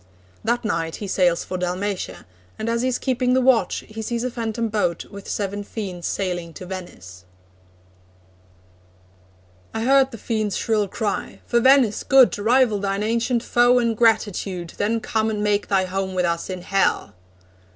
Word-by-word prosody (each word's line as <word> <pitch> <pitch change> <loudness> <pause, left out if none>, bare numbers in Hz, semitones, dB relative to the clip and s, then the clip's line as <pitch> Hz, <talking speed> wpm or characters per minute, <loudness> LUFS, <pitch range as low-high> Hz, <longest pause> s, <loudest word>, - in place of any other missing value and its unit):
That 235 +1 0
night 165 -5 -1
he 210 - -6
sails 180 -3 +2
for 185 - -5
Dalmatia, 185 +2 -3 0.3
and 230 - -3
as 235 0 0
he 255 - +1
is 255 - 0
keeping 250 -1 0
the - - +4
watch, 255 -2 +2
he 220 +1 -7
sees 235 +2 -2
a 255 - -2
phantom 230 -1 -2
boat 205 -6 -1
with 200 -1 -9
seven 205 0 -3
fiends 190 -5 -5
sailing 175 -4 -3
to 185 - -8
Venice: 95 - -9 2.5
I 225 - -1
heard 270 +1 +4
the 230 - -9
fiends' 215 -2 -2
shrill 215 -3 +1
cry: 205 +1 -3
'For 240 - +2
Venice' 260 -3 +4
good! 265 -2 +5
Rival 230 0 +3
thine 195 +1 -1
ancient 235 +2 0
foe 245 +1 +4
in 235 -2 +2
gratitude, 205 -6 0
Then 220 +2 0
come 220 0 0
and 210 -1 -2
make 205 -1 +1
thy 190 -2 +2
home 190 0 -3
with 180 -1 +1
us 170 +1 -2
in 185 -1 -5
Hell!' 195 +1 +1
210 Hz, 165 wpm, -22 LUFS, 190-235 Hz, 2.5 s, good